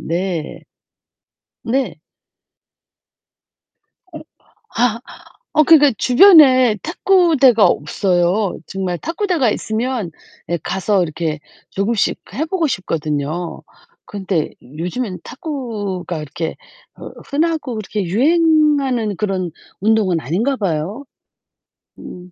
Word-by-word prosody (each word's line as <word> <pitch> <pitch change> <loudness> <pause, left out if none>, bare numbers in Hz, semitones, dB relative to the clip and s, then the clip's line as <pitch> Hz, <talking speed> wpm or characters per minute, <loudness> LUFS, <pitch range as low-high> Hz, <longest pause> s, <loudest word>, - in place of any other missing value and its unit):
네. 170 -1 -3 1.0
네. 260 +3 -1 2.2
어. - - -6 0.6
아 235 -1 +1 0.5
어 305 - +5
그니까 295 -3 +6
주변에 260 - +6
탁구대가 320 - +3
없어요. 180 +5 0
정말 190 -2 -3
탁구대가 335 - 0
있으면 220 -3 -3 0.4
예 170 - +1
가서 190 +1 0
이렇게 155 -2 -3 0.3
조금씩 200 +2 0 0.2
해 300 - -1
보고 330 0 -1
싶거든요. 160 - -3 0.4
근데 190 -6 -3
요즘에는 180 - -5
탁구가 205 - -5
이렇게 160 +2 -5 0.4
흐 - - -10
흔하고 305 -3 -1
그렇게 210 -1 -3
유행하는 280 - +2
그런 190 -4 -2 0.3
운동은 205 -5 +2
아닌가 195 - -1
봐요. 195 - -3 1.0
음. 180 0 -11
210 Hz, 205 characters per minute, -18 LUFS, 180-275 Hz, 2.2 s, 그니까